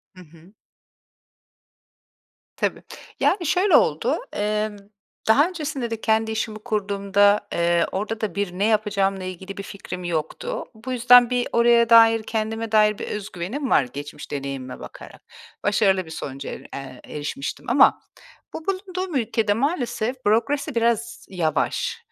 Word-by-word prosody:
Hı 185 - -12
hı. 165 +5 -19 2.0
Tabii. - - -1 0.4
Yani, 365 -4 +2
şöyle 365 +6 +3
oldu: - - +3 0.2
Emm, 210 0 -1 0.5
daha 285 +9 +5
öncesinde 295 -8 -4
de 225 - -4
kendi 220 0 +1
işimi 215 0 -3
kurduğumda, 205 -2 +1
eee, 170 0 +2
orada 215 +3 -3
da 205 -6 -3
bir 200 -3 -1
ne 205 - +2
yapacağımla 200 -3 +1
ilgili 185 +2 -7
bir 200 - -5
fikrim 185 -3 -8
yoktu. 175 - -3
Bu 245 +4 -7
yüzden 245 0 +6
bir 245 -1 0
oraya 235 0 +4
dair, 225 -1 +7
kendime 220 0 -3
dair 210 -1 +4
bir - - -6
öz 210 0 -5
güvenim 235 +11 -4
var 140 - +4
geçmiş 145 +4 -9
deneyimime 135 -2 -5
bakarak. - - -11 0.4
Başarılı 195 -3 +2
bir 160 - -11
sonuca 140 -3 -6
er - - -7
eee, 135 -2 -8
erişmiştim 145 - -5
ama 265 +2 +5 0.5
bu 320 - -7
bulunduğum 370 -3 -3
ülkede 220 -3 +1
maalesef 255 -2 -2
bürokrasi 260 +6 +1
biraz 230 -1 0
yavaş; 190 - -1
215 Hz, 140 wpm, -23 LUFS, 190-240 Hz, 2.0 s, dair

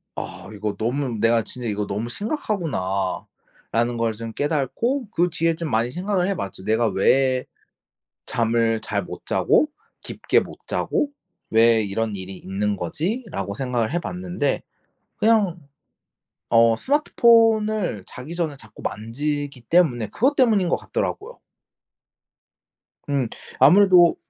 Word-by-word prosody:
아 95 0 -7
이거 105 0 -3
너무 125 +1 -1
내가 115 0 +3
진짜 125 0 -7
'이거 105 -1 -1
너무 110 +4 -3
심각하구나.'라는 120 - -3
걸 115 -1 0
좀 115 +1 -7
깨닫고 190 - -1
그 175 +1 +2
뒤에 165 0 +1
좀 165 -2 -4
많이 115 +3 +1
생각을 185 +2 0
해 200 - 0
봤지. 95 - -6
'내가 110 +2 +2
왜 130 +7 +2 0.8
잠을 115 -1 +1
잘 - - -2
못 - - -9
자고 305 - +3 0.3
깊게 - - +1
못 - - -9
자고 285 - -1 0.4
왜 115 0 +5
이런 105 +1 -2
일이 95 0 -7
있는 100 +2 -2
거지?'라고 155 - -3
생각을 120 -1 -1
해 175 - +1
봤는데 180 -4 -2 0.6
그냥 210 -5 +2 0.9
어 115 -1 +5
스마트폰을 220 - +3
자기 140 +7 -8
전에 160 -5 -2
자꾸 115 -4 -14
만지기 140 +4 -3
때문에 120 - +2
그것 265 - +1
때문인거 210 -9 +3
같더라고요. 470 +5 -4 1.7
음. 135 -5 0 0.3
아무래도 175 +3 +7
130 Hz, 260 characters per minute, -23 LUFS, 110-180 Hz, 1.7 s, 아무래도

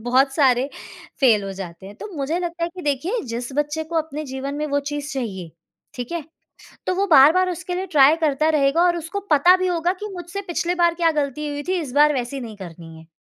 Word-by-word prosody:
बहुत 265 +3 +2
सारे, 265 -2 +3 0.5
फेल 220 -6 +4
हो 195 - -5
जाते 175 0 -8
हैं 200 - -10
तो 430 - -8
मुझे 295 +5 -1
लगता 340 -1 -3
है - - -2
कि 360 - -7
देखिए 300 - -1
जिस 240 +3 -4
बच्चे 295 +2 -1
को 330 +1 -5
अपने 310 -1 -2
जीवन 265 +2 -5
में 300 +1 -2
वो 285 0 0
चीज़ 290 +1 -5
चाहिए, 195 -10 -5 0.4
ठीक 245 +5 -6
है? 335 -4 -3 0.6
तो 370 - +2
वो 395 +1 +1
बार-बार 325 +5 +6
उसके 360 0 -4
लिए 375 +1 -2
ट्राई 290 +1 +6
करता 305 +1 +2
रहेगा 295 +2 +3
और 345 -1 +3
उसको 340 +5 -4
पता 345 +6 +6
भी 370 0 0
होगा 350 +1 0
कि 420 - -3
मुझसे 350 +3 -6
पिछली 350 0 -1
बार 345 -1 +3
क्या 335 -1 +2
गलती 300 0 -2
हुई 290 0 -4
थी, 370 -1 +1
इस 270 -5 -6
बार 295 +1 +5
वैसी 255 +1 -3
नहीं 220 -3 -8
करनी 165 -3 -10
है। 160 - -16
295 Hz, 225 wpm, -22 LUFS, 265-340 Hz, 0.6 s, बार-बार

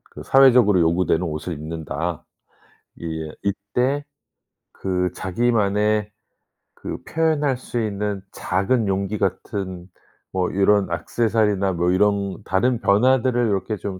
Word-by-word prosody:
그 - - -8
사회적으로 125 -7 +5
요구되는 85 +1 +2
옷을 80 +1 -4
입는다. 80 +1 -4 0.8
이 80 -2 -5
이때 125 +8 -1 0.7
그 90 -1 -1
자기만의 105 0 +1 0.7
그 - - -6
표현할 155 -4 +1
수 125 - -6
있는 105 -1 -3
작은 100 +5 0
용기 100 +2 -1
같은 95 -2 -3 0.4
뭐 95 -1 0
요런 100 0 +3
액세서리나 105 +1 0
뭐 85 +1 +1
이런 100 +1 +1
다른 120 +6 +1
변화들을 120 +3 +3
요렇게 100 +2 -1
좀 95 -2 -6
100 Hz, 245 characters per minute, -22 LUFS, 90-115 Hz, 0.8 s, 사회적으로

